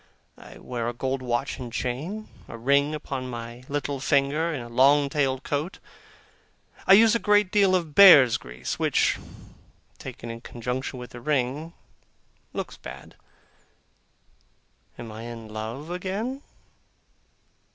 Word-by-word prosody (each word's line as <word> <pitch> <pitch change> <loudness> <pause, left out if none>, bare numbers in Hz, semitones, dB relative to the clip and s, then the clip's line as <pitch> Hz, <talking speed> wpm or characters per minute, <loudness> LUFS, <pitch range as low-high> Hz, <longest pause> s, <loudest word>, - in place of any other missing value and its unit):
I - - -13
wear 120 -2 -4
a - - -5
gold 130 +2 -2
watch 125 +3 -2
and 125 -2 -7
chain, 150 - -4 0.2
a - - -8
ring 140 +5 +2
upon 130 -4 -5
my 120 0 -7
little 145 -1 -2
finger, 140 +5 +1
and 140 -7 -4
a - - -9
long 140 +4 +4
tailed 135 -2 0
coat; 150 +6 -3 1.0
and - - -21
I 195 - +8
use 220 +2 +7
a 235 - +2
great 205 -3 +3
deal 200 -3 +4
of 165 -5 -2
bear's 145 -10 +9
grease 60 +1 -6
which, - - +2 0.8
taken 115 - -7
in 115 0 -8
conjunction 125 +3 -4
with 125 0 -9
the 120 - -10
ring, 145 +4 -1 0.8
looks - - -5
bad. - - -10 1.8
Am 115 -2 -8
I 110 +1 -8
in 115 -1 -8
love 115 +9 -6
again? 200 +9 -3
135 Hz, 140 wpm, -25 LUFS, 120-160 Hz, 1.8 s, bear's